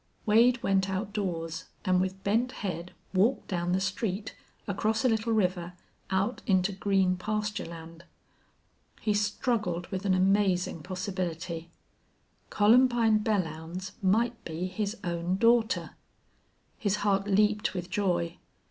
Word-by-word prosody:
Wade 235 +3 +4
went 195 0 +2
outdoors, 185 -4 -3 0.2
and 185 0 +3
with 190 +1 -3
bent 235 +5 +1
head 180 -3 -4 0.2
walked 210 +8 +2
down 175 -2 -1
the 185 - +2
street, 195 +2 -2 0.3
across 215 +4 0
a - - +5
little 225 0 0
river, 180 -4 0 0.4
out 195 +5 0
into 190 -1 +3
green 190 -1 +1
pasture 210 +2 -2
land. 165 0 -10 0.9
He 210 - 0
struggled 205 -3 0
with 190 -1 -4
an 190 -2 +3
amazing 185 -3 +2
possibility. 180 -2 -4 0.8
Columbine 230 0 +4
Belllounds 180 -3 -2
might 225 +5 +1
be 165 +2 -4
his 205 +3 -3
own 175 +1 -1
daughter. 230 +2 +3 0.9
His 205 -2 +1
heart 200 -1 +2
leaped 210 +1 +2
with 180 0 -5
joy. 175 -4 0
195 Hz, 120 wpm, -29 LUFS, 180-215 Hz, 0.9 s, a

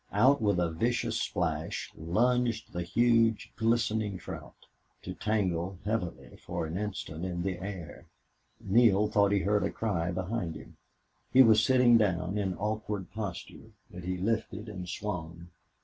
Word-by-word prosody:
Out 130 +6 +4
with 100 -4 +2
a 85 -2 +1
vicious 115 +9 0
splash - - -2
lunged 115 +7 0
the 90 - -2
huge, 115 +4 +2
glistening 110 -3 +1
trout, - - -9 0.5
to - - -5
dangle 95 -4 -1
heavily 105 -5 -3
for - - -4
an 80 +1 -5
instant 95 -5 -4
in 90 -2 -3
the 95 -2 -2
air. 95 -3 -7 0.5
Neale 105 0 +4
thought 100 -1 +3
he 100 -1 +2
heard 105 +3 +1
a - - 0
cry 90 -6 -1
behind 90 -1 -3
him. - - -11 0.6
He 130 - +8
was 110 -2 +5
sitting 125 -2 +5
down, 95 -1 0
in 95 -2 -1
awkward 105 -3 -3
posture. 105 -4 -7 0.2
But 90 0 -9
he 90 0 -2
lifted 110 +2 -2
and 90 -4 -7
swung. 85 -3 -5
100 Hz, 150 wpm, -30 LUFS, 90-110 Hz, 0.6 s, He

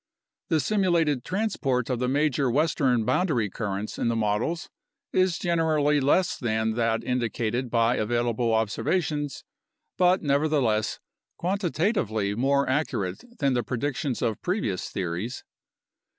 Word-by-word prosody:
The 160 -3 +3
simulated 170 - +1
transport 165 - -1
of 125 -3 -1
the 125 - 0
major 140 -1 +1
western 130 -4 +2
boundary 125 - +1
currents 100 0 -4
in - - 0
the 115 - +1
models 115 - -1 0.5
is 185 -3 +2
generally 155 -4 +2
less 155 +7 +2
than 110 -2 0
that 115 -1 0
indicated 120 0 -1
by 115 +1 +2
available 120 +1 0
observations 145 - -1 0.6
but 180 0 +4
nevertheless 140 -7 +1 0.4
quantitatively 170 - 0
more 140 +5 +2
accurate 115 -10 -1
than 140 -4 +1
the 120 - +1
predictions 130 +3 -2
of 110 -2 -1
previous 180 - -2
theories. 95 +7 -4
130 Hz, 120 wpm, -26 LUFS, 115-155 Hz, 0.6 s, but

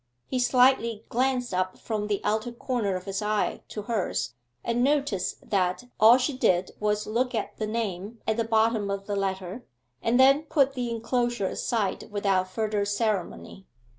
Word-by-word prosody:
He 255 - -2
slyly 245 -3 +3
glanced 250 -2 0
up 185 0 -1
from 215 -2 -3
the 205 -1 -1
outer 215 +3 0
corner 235 -5 -2
of 185 0 -5
his 195 0 -3
eye 210 0 0
to 210 - -6
hers, 190 - -2 0.3
and 235 +1 +1
noticed 275 -9 0
that 185 +2 0 0.2
all 225 +3 +8
she 265 +2 -1
did 185 -7 +2
was 210 0 0
look 245 +3 0
at 220 - -3
the 215 - -2
name 215 -1 -3
at 220 0 +1
the 230 - +2
bottom 220 -2 +2
of 200 0 -3
the 205 - -2
letter, 195 +3 -3 0.4
and 240 +2 +2
then 275 +3 +6
put 275 -3 +2
the 250 -2 -2
enclosure 235 -1 -1
aside 205 +1 -2
without 195 -2 +1
further 210 +1 -1
ceremony. 200 -2 -2
220 Hz, 165 wpm, -27 LUFS, 200-240 Hz, 0.4 s, all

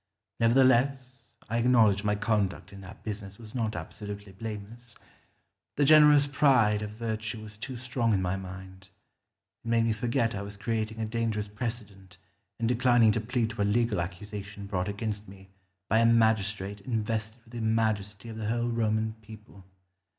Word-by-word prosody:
Nevertheless 130 0 +2
I 115 +2 -1
acknowledge 115 -4 +4
my 105 0 +1
conduct 105 -2 -1
in 100 - -10
that 95 - -12
business 100 -2 -6
was 110 -2 -12
not 110 -3 -1
absolutely 105 -1 -7
blameless. 110 +3 -8 0.8
The 145 - +3
generous 150 -1 +7
pride 130 -7 +3
of 105 - -4
virtue 110 0 -4
was 105 -1 -11
too 125 +4 -6
strong 120 -1 -1
in 100 - +3
my 90 +1 0
mind. 95 0 -9 0.7
It - - -10
made 115 0 +3
me 115 - +2
forget 115 +1 0
I 100 - -4
was 100 0 -8
creating 110 +1 -2
a 110 - -1
dangerous 110 -2 -2
precedent 105 -4 -6 0.4
in 115 - 0
declining 120 -1 +4
to 110 - 0
plead 115 0 -1
to 105 - -4
a - - +4
legal 105 -2 +1
accusation 100 +3 -7
brought 95 -1 -2
against 105 0 -4
me 95 0 -14 0.4
by 110 - +3
a 115 - +4
magistrate 110 -3 +2
invested 110 -1 -2
with 115 - -20
the 120 - -4
majesty 110 -2 0
of 110 -1 -7
the 110 -1 -3
whole 120 +1 0
Roman 110 -1 0
people. 105 -3 -14
110 Hz, 165 wpm, -28 LUFS, 100-115 Hz, 0.8 s, generous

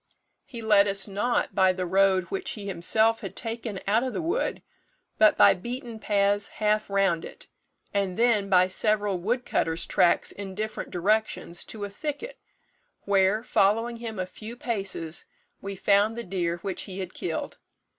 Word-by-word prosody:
He 235 -3 -8
led 210 -2 +5
us 195 0 +1
not 210 +5 -1
by 190 0 +4
the 185 0 -3
road 190 +1 +3
which 195 - -3
he 210 -3 -8
himself 220 +4 +2
had - - -7
taken 225 -3 -4
out 215 +4 +3
of 260 0 -3
the - - -2
wood, 360 +10 -1 0.6
but 215 -1 +6
by - - +7
beaten 240 +3 -6
paths 205 -1 +1
half 215 0 0
round 195 -4 +1
it, - - -11 0.5
and 195 -3 -1
then 225 -4 +2
by 185 -1 +5
several 205 0 +1
wood 240 +7 -1
cutters' 165 +1 0
tracks 175 - +3
in 195 -2 -8
different 215 +2 -4
directions, 195 -2 0
to 215 -2 -6
a - - -6
thicket, 310 - -5 0.6
where, 200 +2 +2
following 225 +1 +2
him 230 -2 -6
a 185 - -1
few 220 +5 -9
paces, 195 -9 -2 0.4
we 200 0 -5
found 205 +4 +2
the 235 - -3
deer 175 -3 -2
which 190 -2 -3
he 185 - -6
had 185 -1 -5
killed. 360 - -4
205 Hz, 165 wpm, -26 LUFS, 190-225 Hz, 0.6 s, by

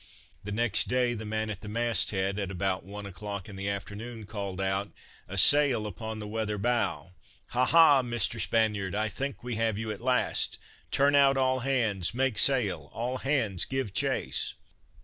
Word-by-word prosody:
The 105 - -6
next 110 0 +1
day 125 -1 +1
the 110 -1 -6
man 110 0 -2
at 100 - -7
the 105 - -9
mast 115 -3 +2
head, 95 0 -1
at 100 -2 -3
about 95 0 -2
one 100 +2 -8
o'clock 100 0 -6
in 105 - -10
the 100 +1 -3
afternoon, 105 +4 -6
called 100 -3 -5
out: 95 +1 -1 0.4
"A 95 +3 -7
sail 135 0 +5
upon 110 +2 -6
the 105 -1 -7
weather 105 -1 -2
bow! 100 -8 -1 0.4
Ha! 125 +1 +1
Ha! 155 -3 +6
Mr. 120 -2 +1
Spaniard, 105 -4 +1
I 110 +1 0
think 135 +4 -5
we 120 -2 -4
have 110 -2 0
you 110 0 -3
at 105 - -7
last. 125 0 +1 0.3
Turn 140 +1 +3
out 140 -1 +5
all 130 0 +1
hands! 115 -7 0
make 130 -4 +1
sail! 100 - +2
All 125 +3 -3
hands 115 - +1
give 130 -7 -3
chase!" - - -1
110 Hz, 180 wpm, -28 LUFS, 100-125 Hz, 0.4 s, Ha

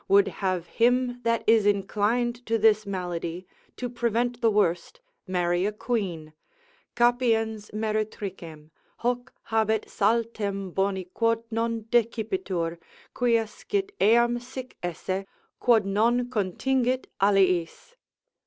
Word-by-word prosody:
would 200 0 +5
have 185 -3 0
him 245 +4 +1
that 230 -1 0
is 225 -1 +5
inclined 215 +5 0
to 225 -1 0
this 215 -1 +3
malady, 180 -2 -4 0.3
to 250 - -3
prevent 240 0 -1
the 230 - +4
worst, 205 - 0 0.3
marry 175 -1 +1
a 205 - +1
quean, 200 -9 -3 0.6
Capiens 225 -3 +1
meretricem, 205 -7 -4 0.3
hoc 245 +1 -1 0.2
habet 220 -1 +1
saltem 205 -3 -1
boni 195 -1 0
quod 230 0 +1
non 230 0 -1
decipitur, 220 - 0 0.3
quia 235 -2 +2
scit 395 - -3
eam 235 +3 +4
sic 255 +1 -9
esse, 185 +2 -3 0.4
quod 230 -5 +4
non 235 +5 +1
contingit 255 +5 0 0.2
aliis. 190 - +2
220 Hz, 110 wpm, -26 LUFS, 195-240 Hz, 0.6 s, would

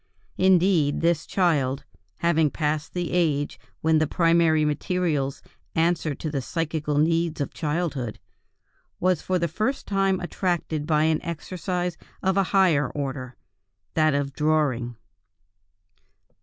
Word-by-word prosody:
Indeed, 180 -5 +3
this 165 -1 +1
child, 145 -8 +1 0.4
having 160 -3 +3
passed 150 +2 -2
the 175 -1 -2
age 150 -5 0 0.2
when 160 0 +3
the 155 - +1
primary 165 -2 +3
materials 150 -2 -1 0.3
answer 160 -2 +1
to 155 - -5
the 140 -3 -1
psychical 155 0 -2
needs 165 +1 +1
of 140 - -3
childhood, 150 -7 -2 0.8
was 180 -3 +2
for 185 - 0
the 170 -1 0
first 215 - -2
time 195 -1 +1
attracted 175 -4 -2
by 155 -1 +3
an 160 0 +2
exercise 175 +1 -3 0.3
of 190 0 +2
a 195 -1 +3
higher 175 -8 +3
order, 135 -3 -5 0.6
that 155 -2 +3
of 140 -1 -1
drawing. 145 -6 0
160 Hz, 125 wpm, -25 LUFS, 150-175 Hz, 0.8 s, Indeed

